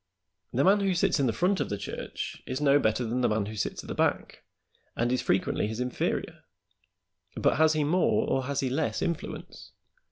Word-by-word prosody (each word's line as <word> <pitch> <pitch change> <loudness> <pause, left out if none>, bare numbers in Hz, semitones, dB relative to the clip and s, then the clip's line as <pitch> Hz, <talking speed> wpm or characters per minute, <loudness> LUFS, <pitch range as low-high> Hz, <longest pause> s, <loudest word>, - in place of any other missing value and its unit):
The 130 +3 +1
man 200 +2 +5
who 195 -2 +1
sits 175 -2 +2
in 135 - +2
the - - +2
front 180 - +1
of - - -1
the 100 - -2
church 100 - -6
is 130 - -3
no 145 -1 +4
better 115 0 +1
than 120 +3 -1
the - - +3
man 105 -1 0
who 110 +2 -7
sits 100 - -3
at - - -12
the - - -4
back, - - -1 0.5
and 120 +1 0
is 130 - +1
frequently 95 +2 0
his 110 +2 -5
inferior; 125 0 -2 1.0
but - - +2
has 160 0 +5
he 155 -1 +1
more 175 +5 +2
or 130 -1 0
has 140 +1 -1
he 130 - 0
less 150 +3 -1
influence? 170 -2 -5
135 Hz, 210 wpm, -28 LUFS, 115-160 Hz, 1.0 s, man